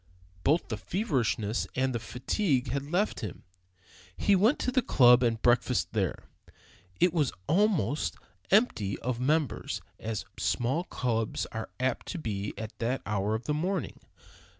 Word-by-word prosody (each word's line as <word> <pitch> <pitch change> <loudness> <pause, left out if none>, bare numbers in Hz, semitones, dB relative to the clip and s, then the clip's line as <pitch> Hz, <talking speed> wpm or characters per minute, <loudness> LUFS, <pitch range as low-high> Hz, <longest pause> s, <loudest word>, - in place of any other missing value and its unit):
Both 155 +5 +2
the 110 - -2
feverishness 120 - -1
and 130 0 +1
the 120 - -1
fatigue 130 - -1
had 140 +1 -3
left 200 +5 +1
him. 105 -7 -6 0.7
He 200 - +4
went 215 +9 +4
to 255 - 0
the 255 - +3
club 125 - +6
and 115 -2 +1
breakfasted 120 -7 +2
there. 95 -6 -1 0.8
It 180 - +4
was 150 -6 +2
almost 165 - +1 0.3
empty 185 - +2
of 125 -1 -2
members, 150 +1 0 0.2
as 110 -2 -4
small 130 +9 0
clubs 115 - -1
are 110 0 -5
apt 130 -1 -1
to 185 - -4
be 105 -9 -3
at 110 0 -7
that 120 +3 -1
hour 105 +1 0
of 110 - -4
the 150 - -1
morning. 180 +4 -2
125 Hz, 150 wpm, -29 LUFS, 110-165 Hz, 0.8 s, club